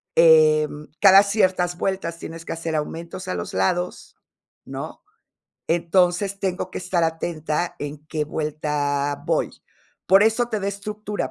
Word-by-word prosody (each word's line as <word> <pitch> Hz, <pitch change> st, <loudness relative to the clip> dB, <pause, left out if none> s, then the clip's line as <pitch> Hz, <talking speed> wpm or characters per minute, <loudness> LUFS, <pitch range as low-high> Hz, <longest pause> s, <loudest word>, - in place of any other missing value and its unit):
em, 155 Hz, -2 st, +5 dB
cada 195 Hz, 0 st, +8 dB
ciertas 185 Hz, -4 st, +1 dB
vueltas 180 Hz, -3 st, -2 dB
tienes 165 Hz, 0 st, -8 dB
que -, -, -4 dB
hacer 165 Hz, -1 st, -4 dB
aumentos 165 Hz, +4 st, -5 dB
a -, -, -2 dB
los 85 Hz, 0 st, -5 dB
lados, 175 Hz, -, -1 dB, 0.5 s
¿no?, -, -, -7 dB, 0.7 s
entonces, 180 Hz, +3 st, +1 dB
tengo 185 Hz, -1 st, -2 dB
que -, -, -5 dB
estar 180 Hz, -2 st, 0 dB
atenta 160 Hz, 0 st, -2 dB
en 145 Hz, 0 st, -5 dB
qué 155 Hz, -2 st, -2 dB
vuelta 145 Hz, -2 st, -2 dB
voy. -, -, +1 dB, 0.6 s
Por 195 Hz, +2 st, +6 dB
eso 225 Hz, +2 st, +2 dB
te 215 Hz, -3 st, -2 dB
da 195 Hz, -, -3 dB
estructura. 205 Hz, -4 st, -4 dB
170 Hz, 140 wpm, -23 LUFS, 155-190 Hz, 0.7 s, cada